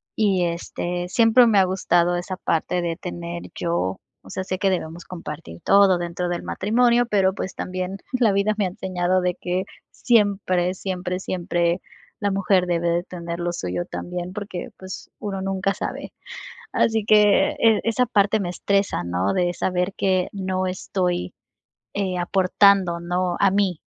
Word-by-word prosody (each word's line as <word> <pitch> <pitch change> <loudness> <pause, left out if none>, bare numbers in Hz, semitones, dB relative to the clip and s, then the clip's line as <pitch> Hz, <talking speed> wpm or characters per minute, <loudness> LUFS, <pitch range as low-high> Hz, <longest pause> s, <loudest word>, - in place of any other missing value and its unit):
y 195 -5 +2
este, 175 +1 -3
siempre 230 +3 +5
me 210 -3 +3
ha - - +6
gustado 175 -2 +2
esa 180 +1 -4
parte 175 +2 0
de 170 -1 -2
tener 170 -1 -6
yo, 170 - -1 0.2
o - - -15
sea, 190 - -4
sé 185 -1 -4
que 195 - +2
debemos 170 -2 -3
compartir 150 - -8
todo 195 -2 +5
dentro 175 +1 -3
del 175 - -3
matrimonio, 240 +4 +2
pero, 190 -3 +2
pues, 190 -2 -5
también 185 +1 -4 0.2
la 240 -5 +3
vida 200 +2 +2
me 205 - +1
ha - - +1
enseñado 185 0 -1
de 180 0 +1
que 180 +1 -2 0.3
siempre, 195 -6 +2
siempre, 185 -1 -3
siempre 175 -1 -1 0.4
la 205 -1 0
mujer 195 -2 +2
debe 170 -1 +1
de 170 +1 +1
tener 170 -2 -6
lo 175 0 -1
suyo 90 - -3
también 180 0 -5
porque, 200 -3 -6
pues, 190 0 -8
uno 195 -2 -4
nunca 195 0 0
sabe. - - -5 0.6
Así 220 -2 +2
que, 210 -1 +5
eh, 225 -2 +4
esa 235 +2 +2
parte 210 -2 +2
me 180 - -2
estresa, 195 - 0
¿no?, 90 +3 0
de 175 -1 +1
saber 180 +1 -1
que 185 -2 +1
no 185 -1 -2
estoy, 180 - -2 0.6
eh, 190 -2 -1
aportando, 185 -1 +3
¿no?, 175 +1 -1
a 200 - +5
mí, 195 -5 +1
185 Hz, 165 wpm, -23 LUFS, 175-200 Hz, 0.6 s, ha